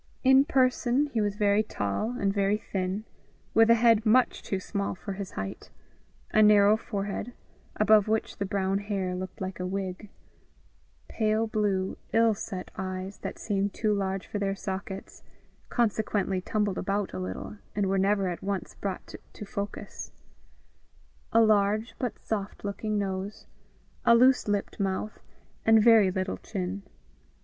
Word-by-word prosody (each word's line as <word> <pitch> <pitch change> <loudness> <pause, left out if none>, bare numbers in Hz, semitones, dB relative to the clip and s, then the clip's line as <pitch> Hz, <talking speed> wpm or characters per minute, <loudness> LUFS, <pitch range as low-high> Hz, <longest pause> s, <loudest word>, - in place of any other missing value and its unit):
In 265 +1 +6
person, 260 -1 +2
he 225 - +1
was 205 -1 0
very 205 0 +3
tall 215 - -2
and 195 -1 +1
very 200 +1 +2
thin, 190 0 -3 0.5
with 225 0 +5
a 230 - +8
head 230 -2 +4
much 240 +3 +3
too 195 - -2
small 200 +1 -3
for 200 +2 -6
his 195 -1 -6
height; 95 0 -6 0.6
a 215 - +4
narrow 210 0 +6
forehead, 205 +1 -4 0.4
above 215 -1 +5
which 220 0 -1
the 200 - -2
brown 195 0 0
hair 200 -3 -2
looked 185 0 -6
like 190 0 -4
a 180 - -2
wig; 190 +1 -4 1.0
pale 220 0 +1
blue, 205 -3 -1
ill 225 0 +5
set 185 -2 -6
eyes, 185 +1 -5
that - - -6
seemed 200 -1 -1
too 215 -1 +1
large 195 -1 -2
for 205 - -4
their 195 -1 -1
sockets, 190 0 -6 0.5
consequently 210 -4 0
tumbled 205 -1 -1
about 200 0 -1
a 95 - -4
little, 95 - -5 0.2
and 205 -1 +1
were 195 0 +1
never 195 0 +2
at 175 -1 -4
once 195 -1 -3
brought 195 -2 -5 0.2
to 210 - -8
focus; 200 +1 -6 1.2
a 230 - +5
large, 215 +1 +3
but 250 - -2
soft 205 -2 -4
looking 210 +1 -2
nose; 195 0 -3 0.6
a 235 - +6
loose 255 +1 +5
lipped 205 -1 -2
mouth, 195 +2 -2 0.4
and 225 -1 +6
very 225 -4 +7
little 185 +1 -2
chin. 190 -1 -4
200 Hz, 150 wpm, -28 LUFS, 190-215 Hz, 1.2 s, a